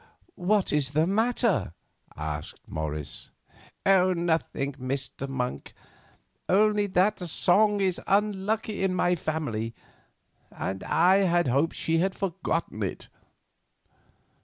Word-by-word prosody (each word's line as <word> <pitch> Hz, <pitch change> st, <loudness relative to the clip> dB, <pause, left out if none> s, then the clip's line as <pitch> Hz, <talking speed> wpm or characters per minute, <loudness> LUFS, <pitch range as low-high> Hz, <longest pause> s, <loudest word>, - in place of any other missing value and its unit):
"What 195 Hz, 0 st, +1 dB
is 145 Hz, -2 st, 0 dB
the 155 Hz, -, +5 dB
matter?" 205 Hz, -, +1 dB, 0.4 s
asked 75 Hz, -1 st, -5 dB
Morris. 75 Hz, -2 st, -4 dB, 0.6 s
"Nothing, 175 Hz, -6 st, +2 dB
Mr. 135 Hz, +1 st, -4 dB
Monk; 125 Hz, -2 st, -4 dB, 0.7 s
only 210 Hz, +2 st, +3 dB
that 190 Hz, +3 st, +2 dB
song 200 Hz, +4 st, +3 dB
is 185 Hz, -2 st, 0 dB
unlucky 210 Hz, +1 st, 0 dB
in 190 Hz, -1 st, +1 dB
my 180 Hz, 0 st, +2 dB
family, 145 Hz, -9 st, -3 dB, 0.7 s
and 95 Hz, 0 st, -5 dB
I 190 Hz, +4 st, +4 dB, 0.2 s
hoped 140 Hz, +4 st, +1 dB
that -, -, -11 dB
she 165 Hz, 0 st, +1 dB
had 190 Hz, +2 st, 0 dB
forgotten 190 Hz, -2 st, -2 dB
it." -, -, -4 dB
175 Hz, 105 wpm, -27 LUFS, 135-195 Hz, 0.7 s, the